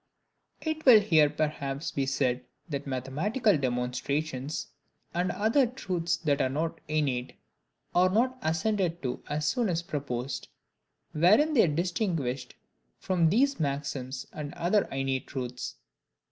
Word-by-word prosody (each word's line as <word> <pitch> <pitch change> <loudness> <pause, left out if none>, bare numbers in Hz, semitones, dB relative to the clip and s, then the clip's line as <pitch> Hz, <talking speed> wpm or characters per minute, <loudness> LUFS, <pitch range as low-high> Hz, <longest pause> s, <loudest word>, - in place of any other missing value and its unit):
It 315 -1 -3
will 245 -5 +9
here 160 -8 +4
perhaps 150 -1 -2
be 135 -1 -1
said 130 -2 0 0.2
that 145 -3 -4
mathematical 155 - +1
demonstrations, 130 +2 -2 0.5
and 180 +1 0
other 225 +7 +3
truths 180 -8 -2
that 145 -4 +1
are 130 - +2
not 165 +4 -2
innate, 140 -5 -1 0.6
are 180 +1 +5
not 245 +6 +2
assented 170 +1 0
to 125 -2 -3
as 150 +1 -1
soon 240 - +1
as 170 -1 -1
proposed, 135 -5 -4 0.6
wherein 215 - +4
they 240 - +6
are 150 -3 -1
distinguished 165 - -1 0.4
from 175 -4 +2
these 270 - +2
maxims 140 -3 -3
and 150 -2 -6
other 190 +4 +2
innate 135 -1 -2
truths. 125 -2 -5
155 Hz, 130 wpm, -29 LUFS, 135-185 Hz, 0.6 s, will